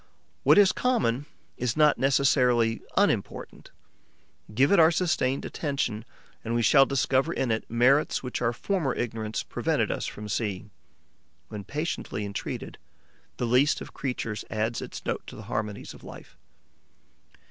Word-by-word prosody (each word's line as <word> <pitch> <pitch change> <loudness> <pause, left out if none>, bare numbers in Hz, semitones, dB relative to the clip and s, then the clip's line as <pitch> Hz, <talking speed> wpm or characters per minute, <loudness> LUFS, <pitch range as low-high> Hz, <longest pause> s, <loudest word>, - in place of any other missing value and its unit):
What - - +5
is 200 -2 +7
common 150 - 0 0.3
is 125 +2 -2
not 150 -1 +4
necessarily 125 -4 +3 0.2
unimportant. - - -1 0.8
Give 130 +6 +3
it 200 - +5
our 160 -1 +7
sustained 160 -6 0
attention 125 -7 -3 0.4
and 115 +1 -2
we 120 - +1
shall 135 +3 +6
discover 135 +2 +1
in 130 -7 -1
it 110 - -2
merits 130 +7 +3
which 125 -1 -4
our 115 -1 +2
former 155 - -1
ignorance 110 -2 -3
prevented - - -1
us - - -3
from 105 0 -7
seeing. 105 -1 -3 0.8
When 105 -1 -6
patiently 145 - -3
entreated, 100 -1 -6 0.6
the 125 - -1
least 130 +5 +3
of - - -10
creatures 120 -5 -4
adds 110 +2 -1
its - - -8
note - - -2
to - - -9
the 110 - -9
harmonies 105 -1 -4
of - - -15
life. - - -12
125 Hz, 145 wpm, -27 LUFS, 110-140 Hz, 0.8 s, is